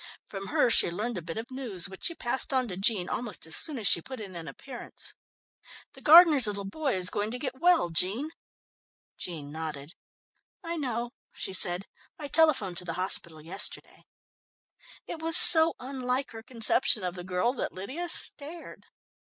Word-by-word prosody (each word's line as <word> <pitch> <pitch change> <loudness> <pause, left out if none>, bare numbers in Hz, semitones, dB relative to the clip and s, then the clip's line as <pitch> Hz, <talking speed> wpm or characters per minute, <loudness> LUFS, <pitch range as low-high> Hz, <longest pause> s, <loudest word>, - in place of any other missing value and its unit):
From 195 -1 -9
her 235 - +1
she - - +7
learnt 210 +4 -5
a - - -11
bit 165 +2 -9
of 235 +4 -8
news, 230 -10 -3
which 190 -1 -10
she 335 - 0
passed 255 0 -1
on 260 -2 0
to 180 - -5
Jean 195 -1 0
almost 235 -8 -4
as 160 - +1
soon 305 -4 +2
as 220 - -6
she 170 - +5
put 260 +6 -10
in 195 -4 -10
an 165 -1 -9
appearance. 255 -3 -11 0.8
"The - - -16
gardener's 310 -6 +6
little 200 -1 -3
boy 270 +5 -3
is 180 -1 +1
going 205 +1 -3
to 245 - -5
get 260 0 -6
well, 345 - +2
Jean." 205 - +3 0.8
Jean 150 -5 -7
nodded. 155 -1 -8 0.7
"I 335 0 -5
know," 240 -6 -5 0.2
she 190 - -3
said. 185 0 +2 0.3
"I 290 -2 -7
telephoned 270 - +3
to 180 - +1
the 165 - -5
hospital 170 -4 -2
yesterday." 185 +6 -2 1.0
It 325 - -9
was 325 +1 +3
so 325 -1 +5
unlike 255 0 -5
her 225 - -11
conception 225 -2 +1
of 180 -1 -4
the 180 -1 -9
girl, 185 +7 -2
that 265 - -5
Lydia 270 - -7
stared. 325 +1 -1
225 Hz, 175 wpm, -26 LUFS, 185-270 Hz, 1.0 s, she